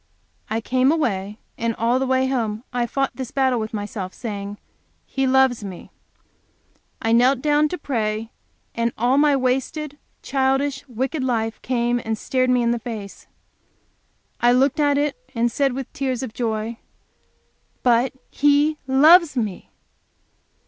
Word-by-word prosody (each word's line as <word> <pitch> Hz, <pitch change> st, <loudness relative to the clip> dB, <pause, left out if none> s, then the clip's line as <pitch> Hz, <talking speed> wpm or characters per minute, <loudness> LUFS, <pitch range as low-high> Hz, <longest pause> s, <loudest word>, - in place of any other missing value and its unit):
'" -, -, -43 dB
I 225 Hz, +1 st, -1 dB
came 255 Hz, +4 st, +2 dB
away, 210 Hz, -10 st, -1 dB, 0.2 s
and 230 Hz, -1 st, -1 dB
all 235 Hz, +3 st, +1 dB
the 265 Hz, -, -1 dB
way 260 Hz, 0 st, +2 dB
home 230 Hz, -4 st, -2 dB
I 240 Hz, -1 st, 0 dB
fought 275 Hz, +2 st, -1 dB
this 260 Hz, -2 st, -6 dB
battle 260 Hz, -3 st, +1 dB
with 220 Hz, 0 st, -4 dB
myself, 205 Hz, -3 st, -5 dB
saying, 205 Hz, -3 st, -5 dB, 0.5 s
"He 270 Hz, -1 st, -1 dB
loves 260 Hz, -3 st, +3 dB
me!" 190 Hz, -3 st, -9 dB, 1.1 s
I 225 Hz, -, -1 dB
knelt 250 Hz, +3 st, +4 dB
down 300 Hz, 0 st, +3 dB
to 360 Hz, -, -4 dB
pray, 225 Hz, -5 st, -2 dB, 0.4 s
and 235 Hz, 0 st, 0 dB
all 250 Hz, +4 st, +3 dB
my 295 Hz, -1 st, +4 dB
wasted, 270 Hz, +3 st, -1 dB, 0.2 s
childish, 270 Hz, +1 st, 0 dB
wicked 265 Hz, +4 st, -2 dB
life 225 Hz, -3 st, -1 dB
came 240 Hz, -1 st, 0 dB
and 220 Hz, 0 st, -2 dB
stared 255 Hz, +2 st, 0 dB
me 250 Hz, -1 st, +3 dB
in 235 Hz, -, +2 dB
the 235 Hz, -, -1 dB
face. 215 Hz, -4 st, -8 dB, 1.1 s
I 240 Hz, 0 st, +4 dB
looked 270 Hz, +4 st, +2 dB
at 290 Hz, -1 st, +3 dB
it, 290 Hz, 0 st, 0 dB, 0.2 s
and 235 Hz, +1 st, +1 dB
said 275 Hz, +1 st, +1 dB
with 265 Hz, 0 st, -6 dB
tears 265 Hz, -2 st, -2 dB
of 235 Hz, -4 st, -6 dB
joy, 225 Hz, -1 st, -3 dB, 1.0 s
"But 245 Hz, +1 st, +3 dB, 0.2 s
He 290 Hz, +1 st, +3 dB
loves 305 Hz, +3 st, +6 dB
me!" 210 Hz, -6 st, -3 dB
250 Hz, 150 wpm, -22 LUFS, 225-270 Hz, 1.1 s, loves